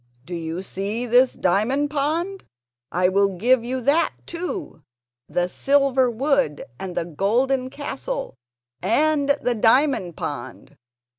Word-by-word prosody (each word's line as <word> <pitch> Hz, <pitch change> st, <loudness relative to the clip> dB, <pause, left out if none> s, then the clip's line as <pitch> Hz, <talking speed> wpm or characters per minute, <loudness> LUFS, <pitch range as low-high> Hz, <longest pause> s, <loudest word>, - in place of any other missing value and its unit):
"Do 180 Hz, -, -8 dB
you 165 Hz, +2 st, -4 dB
see 205 Hz, +6 st, -3 dB
this 245 Hz, +2 st, +4 dB
diamond 255 Hz, +11 st, +1 dB
pond? 330 Hz, +7 st, -1 dB, 0.5 s
I 180 Hz, +1 st, +2 dB
will 195 Hz, 0 st, +2 dB
give 240 Hz, +5 st, +3 dB
you 255 Hz, +2 st, -3 dB
that 285 Hz, +7 st, +2 dB
too, 345 Hz, -, -5 dB, 0.5 s
the 175 Hz, +3 st, 0 dB
silver 270 Hz, +3 st, +2 dB
wood 270 Hz, -, 0 dB
and 185 Hz, -2 st, -6 dB
the -, -, 0 dB
golden 250 Hz, -, 0 dB
castle 400 Hz, -, -5 dB, 0.5 s
and 285 Hz, -, +2 dB
the 245 Hz, -, +2 dB
diamond 225 Hz, -, +2 dB
pond. 130 Hz, -4 st, -6 dB
245 Hz, 125 wpm, -23 LUFS, 190-280 Hz, 0.5 s, this